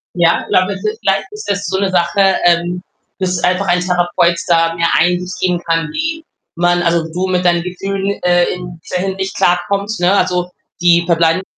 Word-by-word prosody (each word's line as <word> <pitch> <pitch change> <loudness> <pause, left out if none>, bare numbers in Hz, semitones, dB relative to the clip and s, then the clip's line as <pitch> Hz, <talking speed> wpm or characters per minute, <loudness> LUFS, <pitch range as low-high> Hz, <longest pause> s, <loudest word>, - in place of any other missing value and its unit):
Ja, 170 -1 +3
ich - - -11
glaube, 185 +2 +2
es 195 - -9
ist 215 +1 -2
vielleicht 195 -1 +1
ist 420 - -8
das 200 0 -1
so 190 +1 -1
'ne 195 -1 0
Sache, 185 +2 +2
ähm, 175 +1 +1 0.4
dass 180 -2 -1
einfach 185 +2 +1
ein 175 0 +2
Therapeut 175 -1 +1
da 165 -1 +2
mehr 170 0 +1
Einsicht 180 +2 0
geben 180 -2 +1
kann, 165 -2 0
wie 320 +1 -3 0.3
man 175 0 +1
also, 170 -1 +1
du 180 +3 -2
mit 180 -1 0
deinen 175 -1 +2
Gefühlen, 195 +2 -3
äh, 175 0 +3
in 175 -2 -8
dieser 180 0 -3
Hinsicht 190 0 -4
klarkommt, 195 +4 0
ne? 180 +2 +3
Also, 180 -1 0 0.3
die 170 -1 +4
verbleibende 165 +1 +2
180 Hz, 190 wpm, -16 LUFS, 175-190 Hz, 0.4 s, die